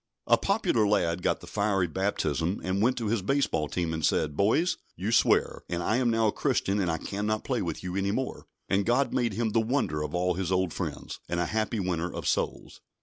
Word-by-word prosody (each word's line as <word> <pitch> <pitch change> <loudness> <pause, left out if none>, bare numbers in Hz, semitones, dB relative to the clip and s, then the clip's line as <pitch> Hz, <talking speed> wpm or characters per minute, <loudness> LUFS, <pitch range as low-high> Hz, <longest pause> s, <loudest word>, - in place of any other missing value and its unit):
A - - +6
popular 190 - +1
lad 90 -4 +1
got - - 0
the - - -10
fiery 100 -3 +1
baptism, 90 -1 -1
and 95 +2 0
went 125 +4 +2
to 115 - -2
his 110 0 0
baseball 120 - +1
team, 85 +1 -2
and 80 -1 -3
said: 75 0 +1
"Boys, 125 - +2 0.2
you 100 +6 -2
swear, - - +3
and 85 0 -2
I 110 - +1
am 125 -2 +2
now 115 -1 +2
a 105 - +3
Christian, 100 0 0
and 90 -3 +1
I 80 - 0
cannot 105 +5 -2
play 125 -3 -1
with 85 -3 -4
you 90 0 -4
any 100 0 0
more"; 130 +5 -3 0.2
and 100 +1 +2
God 125 +6 +1
made 120 -4 +1
him 115 +1 -1
the 115 +1 +3
wonder 110 - 0
of 75 +2 -3
all 90 +1 +1
his 95 0 -3
old 95 -2 +1
friends, - - -5
and 85 - -1
a 90 - +1
happy 110 +2 -1
winner 90 -2 -1
of - - -5
souls. - - -2
100 Hz, 225 wpm, -28 LUFS, 90-115 Hz, 0.2 s, A